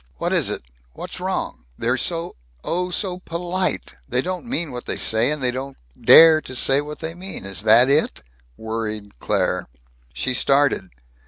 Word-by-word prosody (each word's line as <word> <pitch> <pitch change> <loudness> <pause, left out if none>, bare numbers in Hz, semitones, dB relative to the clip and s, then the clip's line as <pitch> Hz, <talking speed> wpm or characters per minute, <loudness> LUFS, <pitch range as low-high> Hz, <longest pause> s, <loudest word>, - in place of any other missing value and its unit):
"What - - -1
is - - +2
it? - - -3 0.3
What's - - -8
wrong? - - -4
They're - - 0
so 170 0 -2 0.3
oh, 180 +1 -2
so 180 0 -2
polite. 180 +1 -2 0.2
They 125 - +1
don't 185 +5 -5
mean 170 - -2
what 125 -1 -7
they - - 0
say 110 +3 +2
and 150 -2 -2
they 125 - +2
don't 135 +2 -6 0.2
dare 160 - +7
to 130 - -9
say 135 +3 +2
what 150 +1 -8
they 160 0 -5
mean. 180 - -8
Is 95 -3 -4
that 110 +4 +6
it?" 140 - +1 0.3
worried 110 - -5
Claire. - - -1 0.4
She 65 - -2
started. 135 -6 +1
140 Hz, 170 wpm, -21 LUFS, 115-170 Hz, 0.4 s, dare